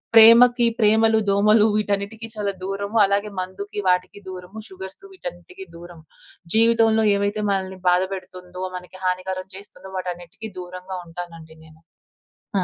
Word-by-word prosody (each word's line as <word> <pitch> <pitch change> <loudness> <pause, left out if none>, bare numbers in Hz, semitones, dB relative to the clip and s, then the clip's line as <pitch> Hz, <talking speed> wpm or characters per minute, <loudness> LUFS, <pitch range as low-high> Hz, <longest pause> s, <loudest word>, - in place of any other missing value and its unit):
ప్రేమకి 235 +2 +8
ప్రేమలు, 220 +1 +4
దోమలు 210 +2 +5
వీటన్నిటికి 210 +2 -2
చాలా 205 -1 -1
దూరము 200 +3 -3
అలాగే 200 +2 0
మందుకి 195 +3 -5
వాటికి 180 +2 +1
దూరము 185 +2 -9
షుగర్స్ 190 - -10
వీటన్నిటికి 385 -2 -9
దూరము. 170 -1 -12 0.5
జీవితంలో 225 0 +4
ఏవైతే 200 +1 -1
మనల్ని 190 -1 -2
బాధపెడుతుందో, 185 0 -2
మనకి 180 +1 -9
హానికరం 185 0 -2
చేస్తుందో 190 -1 -12
వాటన్నిటికి 180 +4 -6
దూరంగా 185 +1 -7
ఉంటానండి 165 -1 -9
నేను. 160 0 -18 0.8
ఆ! - - 0
195 Hz, 120 wpm, -22 LUFS, 180-215 Hz, 0.8 s, ప్రేమకి